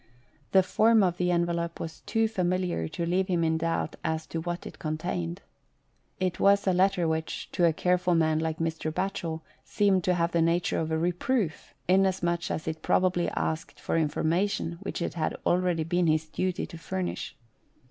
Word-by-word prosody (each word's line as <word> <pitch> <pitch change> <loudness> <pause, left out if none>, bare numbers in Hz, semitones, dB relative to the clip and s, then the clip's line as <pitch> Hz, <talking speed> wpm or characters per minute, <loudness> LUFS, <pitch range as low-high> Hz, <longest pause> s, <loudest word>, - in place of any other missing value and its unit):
The 190 -1 +6
form 220 +3 +4
of 175 -2 +1
the 180 0 +1
envelope 170 -1 0
was 160 0 -6
too 225 -1 +1
familiar 180 - -1
to 170 - -3
leave 185 +2 +1
him 175 -3 +1
in 160 0 +1
doubt 165 0 -1
as 160 0 -1
to 165 - -4
what 175 +1 -4
it - - -9
contained. 95 - -3 0.8
It 185 -2 -1
was 200 0 +4
a 190 - +3
letter 185 -1 +3
which, 160 0 -3
to 175 - +2
a 165 - +5
careful 180 +1 +2
man 160 -1 +2
like 160 -1 -2
Mr. 160 -1 -2
Batchel, 165 -2 -3 0.2
seemed 195 -3 +2
to 180 - +3
have 170 0 +1
the 170 - +2
nature 170 +1 +1
of 160 - -2
a 160 - 0
reproof, 175 - -1
inasmuch 180 -2 +2
as 160 - -3
it 160 0 -3
probably 180 -2 +2
asked 160 0 -3
for - - -2
information 165 +3 0
which 195 -3 -3
it - - -3
had 160 -2 -1
already 175 -2 +2
been 175 +2 +1
his 155 0 +2
duty 185 +3 -2
to 165 - -10
furnish. 185 +3 -4
170 Hz, 180 wpm, -28 LUFS, 160-185 Hz, 0.8 s, The